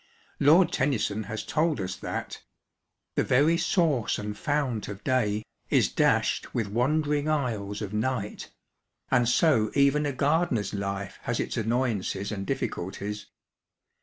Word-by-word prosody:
Lord 165 +4 +5
Tennyson 110 -7 0
has 110 +1 -5
told 155 -2 +1
us 95 0 -3
that - - -5 0.7
The - - +1
very 145 +6 +4
source 160 - +1
and 105 0 -4
fount 140 -6 -1
of 100 -1 -8
day 110 -5 +1 0.3
Is - - +3
dashed - - +1
with 115 - +1
wandering 145 +6 +1
isles 110 -9 -1
of 100 0 -6
night, 110 -1 -2 0.6
and 120 -1 +3
so 125 -6 +3
even 145 +1 +3
a - - 0
gardener's 140 - +1
life 100 -1 -4
has - - -1
its - - -2
annoyances 110 -4 -1
and 100 -2 -4
difficulties. 100 +3 -4
120 Hz, 135 wpm, -27 LUFS, 105-145 Hz, 0.7 s, Lord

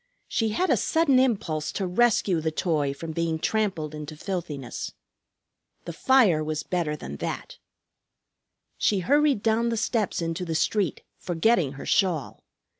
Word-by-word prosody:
She 225 -1 0
had 360 - +1
a - - +4
sudden 320 -6 +3
impulse 195 -12 0
to 195 - -2
rescue 195 -3 +2
the 160 - 0
toy 155 -3 0
from 160 +4 -6
being 165 0 -1
trampled 180 -5 -1
into 150 0 -7
filthiness. 155 - -5 0.9
The 170 - -5
fire 205 -8 +4
was 155 0 -3
better 170 -4 -1
than 70 - -7
that. - - -5 1.2
She 200 -3 +2
hurried 285 - +3
down 225 +1 +2
the 230 - -1
steps 220 -2 0
into 165 +1 -2
the 165 -2 -3
street, 200 +4 0 0.2
forgetting 175 - +1
her 135 - -8
shawl. 180 -8 0
175 Hz, 145 wpm, -26 LUFS, 155-220 Hz, 1.2 s, a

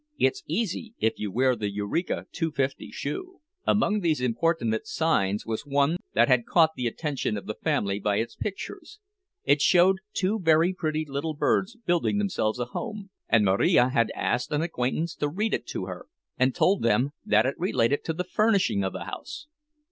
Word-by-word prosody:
"It's 130 - +1
easy, 220 +5 -2
if 110 - 0
you 105 -2 -3
wear 130 +4 +2
the 105 -3 -2
Eureka 105 - -2
Two 165 -2 -1
fifty 135 -1 -2
Shoe." 365 - -5 0.3
Among 210 0 +2
these 165 -6 +1
importunate 120 -2 0
signs 105 -11 0
was 110 -1 -3
one 145 +3 +1 0.2
that 120 +1 +5
had 125 -3 +3
caught 160 -2 +4
the 125 - -1
attention 135 -4 -2
of 100 - -7
the 110 - -3
family 100 -1 -1
by 105 0 0
its 115 +3 -2
pictures. 320 - -6 0.4
It 140 +1 +3
showed 185 +3 +5
two 200 +4 0
very 165 +1 +3
pretty 155 -3 -2
little 145 +3 -3
birds 190 +8 +1
building 175 +3 +1
themselves 185 - 0
a 120 - -2
home; 210 - -6 0.2
and 115 -3 +4
Marija 100 +6 +4
had 115 -3 +1
asked 125 0 -1
an 150 +1 +1
acquaintance 160 +1 -1
to 145 - 0
read 210 +8 -1
it - - -2
to 95 - -4
her, 90 -1 -8 0.3
and 130 0 +1
told 195 +2 +3
them 120 +5 +2
that 110 +2 +3
it 130 - +1
related 145 -7 +1
to 160 - -1
the 180 - -2
furnishing 195 - +2
of 95 - -3
a - - -4
house. 310 +1 -7
145 Hz, 185 wpm, -26 LUFS, 115-180 Hz, 0.4 s, that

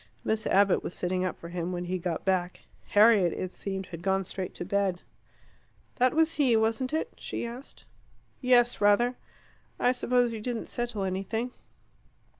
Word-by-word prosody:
Miss 220 0 -1
Abbott 200 -1 +4
was - - -6
sitting 185 +1 -1
up 185 - -2
for 170 - -9
him 175 0 -3
when 180 0 -3
he 185 +1 -2
got 170 -2 -3
back. 185 -2 0 0.3
Harriet, 205 -4 +5
it 185 - -4
seemed, 195 -1 -4
had 170 -2 -9
gone 195 +1 +1
straight 185 +1 -5
to 175 - -5
bed. 195 -2 0 1.0
"That 255 +2 +3
was 320 0 +3
he, 250 -5 +4
wasn't 225 +4 0
it?" 315 - -2
she - - -4
asked. 240 +4 -10 0.6
"Yes, 245 -3 +4
rather." 205 +5 +4 0.6
"I 245 - +4
suppose 245 -1 +1
you 220 - -5
didn't 235 0 -3
settle 240 -4 -3
anything?" 195 +6 -2
205 Hz, 165 wpm, -28 LUFS, 185-240 Hz, 1.0 s, Harriet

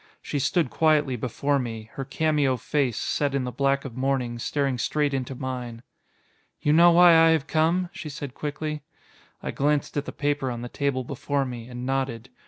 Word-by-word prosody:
She 145 - -3
stood 155 0 +1
quietly 150 -4 +2
before 140 +4 -1
me, 115 -3 -6
her 135 - -4
cameo 145 -1 +1
face, 130 -1 0
set 145 -2 -1
in 135 - 0
the 125 - -3
black 140 +3 0
of 125 -4 -7
mourning, 130 -2 -1
staring 135 0 -1
straight 145 +3 0
into 130 0 -3
mine. 125 -2 -5 0.8
"You 150 - +2
know 170 +2 +7
why 175 +1 +8
I 165 0 +7
have 160 -4 +2
come?" 165 +3 +1
she 155 - -7
said 145 -3 -6
quickly. 150 +1 -4 0.6
I - - -2
glanced 145 +1 0
at 145 - -1
the - - -5
paper 145 -2 -1
on 120 -1 -5
the 120 - -6
table 140 -2 -1
before 140 +2 -2
me, 120 -2 -7
and 125 0 -7
nodded. 130 -3 -2
140 Hz, 190 wpm, -25 LUFS, 125-150 Hz, 0.8 s, why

